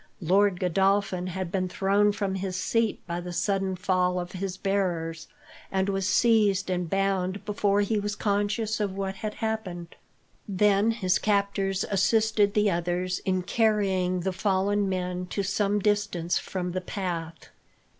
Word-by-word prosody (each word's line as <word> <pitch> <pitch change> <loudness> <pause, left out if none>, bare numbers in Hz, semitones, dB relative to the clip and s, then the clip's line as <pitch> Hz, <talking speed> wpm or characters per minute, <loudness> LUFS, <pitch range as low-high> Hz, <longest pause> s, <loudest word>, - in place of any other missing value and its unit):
Lord 190 +2 +2
Godolphin 190 0 +1
had 185 -1 -4
been 185 -1 -1
thrown 200 +3 +2
from 200 -2 -2
his 190 -1 -3
seat 225 +4 0
by 170 0 -3
the 180 0 -6
sudden 195 +1 0
fall 180 0 +1
of 175 0 -5
his 190 0 -4
bearers, 170 -5 -1 0.4
and 190 0 0
was 195 -1 0
seized 205 -6 +3
and 180 -2 -1
bound 195 0 0
before 205 -1 +1
he 210 +1 +1
was 205 0 -3
conscious 210 +2 0
of 200 -3 -1
what 195 0 -3
had 210 0 -4
happened. 190 -7 -4 0.5
Then 205 +2 +3
his 195 -6 +1
captors 200 -2 0
assisted 210 +1 +2
the 210 -1 +3
others 175 +1 -1
in 185 -1 0
carrying 190 -4 +1
the 190 +1 -1
fallen 200 +1 +1
men 180 -1 -3
to 200 +2 -2
some 200 +1 +1
distance 205 -4 0
from 180 -2 -4
the 185 +1 -2
path. 170 -4 -5
195 Hz, 150 wpm, -27 LUFS, 180-205 Hz, 0.5 s, seized